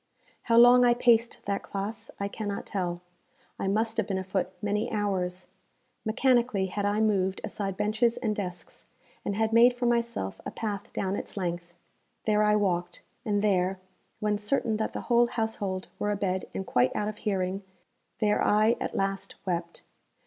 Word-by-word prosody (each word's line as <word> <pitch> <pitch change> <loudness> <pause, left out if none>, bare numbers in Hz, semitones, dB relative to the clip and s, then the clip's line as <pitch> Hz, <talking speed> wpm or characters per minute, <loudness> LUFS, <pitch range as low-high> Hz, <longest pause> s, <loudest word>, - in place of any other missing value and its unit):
How 230 - +5
long 245 +1 +8
I 240 -1 +5
paced 235 -1 +2
that 200 0 -1
classe, 200 +3 -5
I 200 - -1
cannot 205 -1 -4
tell; 175 -3 -3 0.6
I - - -1
must 220 +3 0
have 220 -3 +1
been 195 -3 -1
afoot 190 0 -1
many 210 +3 -1
hours. 185 -4 -1 0.6
Mechanically 240 -3 +2
had 200 +2 -3
I 205 +1 +1
moved 195 -3 +1
aside 195 -2 -3
benches 225 +3 +1
and 215 -2 -1
desks, 180 -3 -6 0.4
and 200 - -2
had 220 +1 0
made 240 +2 +6
for 245 0 -2
myself 235 - 0
a - - -4
path 205 -3 -4
down 190 0 -1
its - - -6
length. 175 -2 -3 0.5
There 210 -1 +3
I 210 0 +4
walked, 175 -4 -1 0.2
and 205 -2 +1
there, 190 -2 +2 0.4
when 210 -1 0
certain 220 0 0
that 220 - -2
the - - -4
whole 240 0 +3
household 220 -5 -2
were 205 - 0
abed 195 -2 -1
and 190 - -4
quite 125 -5 +2
out 210 - 0
of 215 0 -4
hearing, 195 -2 -1 0.6
there 210 -1 +2
I 215 +2 +4
at - - -3
last 195 0 -2
wept. 170 -2 -3
205 Hz, 170 wpm, -28 LUFS, 190-220 Hz, 0.6 s, long